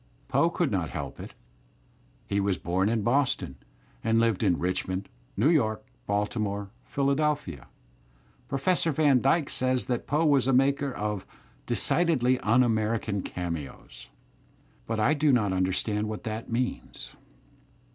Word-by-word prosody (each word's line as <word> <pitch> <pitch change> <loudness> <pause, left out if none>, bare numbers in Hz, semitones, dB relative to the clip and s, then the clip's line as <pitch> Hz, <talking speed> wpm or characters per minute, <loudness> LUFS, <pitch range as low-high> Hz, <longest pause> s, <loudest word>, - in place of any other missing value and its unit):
Poe - - +3
could - - -1
not - - -1
help - - -6
it. - - -9 0.9
He 100 - -1
was 100 -2 0
bom 95 +5 0
in 110 -2 0
Boston, 125 - 0 0.5
and 115 0 +2
lived 115 -4 +2
in 85 - +2
Richmond, 95 +2 -2 0.3
New 120 +9 +4
York, 110 -9 +1 0.2
Baltimore, 100 -1 -2
Philadelphia. 140 - -1 0.8
Professor 165 +4 +1
Van 145 -4 +3
Dyke 140 +2 +2
says 130 0 +1
that 125 -2 -2
Poe 150 +3 +1
was 140 -4 +3
a 135 - +3
maker 140 +2 +2
of 105 -4 -4 0.4
"decidedly 130 -8 +2
un 120 +4 +3
American 110 -3 0
cameos," 85 -7 -6 0.8
but 115 -1 -2
I 120 +7 +3
do 150 -1 +3
not 110 -6 +2
imderstand 95 +3 0
what 110 0 -5
that 110 +1 -5
means. 125 +2 -3
115 Hz, 135 wpm, -27 LUFS, 100-135 Hz, 0.9 s, New